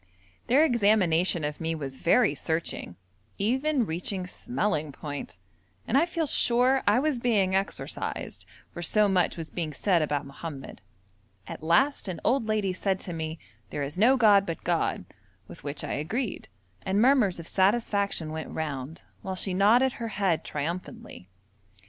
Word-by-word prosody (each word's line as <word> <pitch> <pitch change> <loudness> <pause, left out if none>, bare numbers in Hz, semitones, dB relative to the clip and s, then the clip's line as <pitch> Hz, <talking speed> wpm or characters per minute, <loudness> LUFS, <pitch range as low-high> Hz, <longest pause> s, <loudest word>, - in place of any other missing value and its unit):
Their 280 +6 +5
examination 190 - +2
of 150 +1 -4
me 165 0 -1
was 135 -4 -6
very 240 - +3
searching, 160 - -3 0.4
even 260 +5 +1
reaching 180 +2 -3
smelling 180 - -2
point, 145 - -7 0.5
and - - 0
I 310 +5 +4
feel 335 -2 -1
sure 255 -1 +3
I 205 +3 +5
was 280 -1 +1
being 210 -6 +2
exorcised, 195 +1 -3 0.2
for 175 - -7
so 210 +4 +3
much 185 -4 +1
was 165 -1 -6
being 160 -4 -3
said 175 +3 +2
about 145 -2 -1
Mohammed. 140 0 -8 0.6
At - - -8
last 235 - +2
an 175 -4 -4
old 245 -2 +1
lady 210 -3 0
said 190 0 -1
to 175 - -5
me, 160 0 -4 0.3
'There 145 - -3
is 145 +6 -5
no 255 +5 +5
god 210 -5 +6
but 165 - -5
God!' 170 - 0 0.4
with - - -12
which 145 0 -4
I - - -3
agreed, 205 - -3 0.3
and 195 +1 0
murmurs 235 -7 +3
of 165 - -8
satisfaction 200 -4 +1
went 160 0 -5
round, 150 -1 -5 0.2
while 190 0 -4
she 185 0 0
nodded 225 +8 +4
her 230 - -5
head 195 -6 0
triumphantly. 170 - -6
190 Hz, 155 wpm, -27 LUFS, 160-230 Hz, 0.6 s, god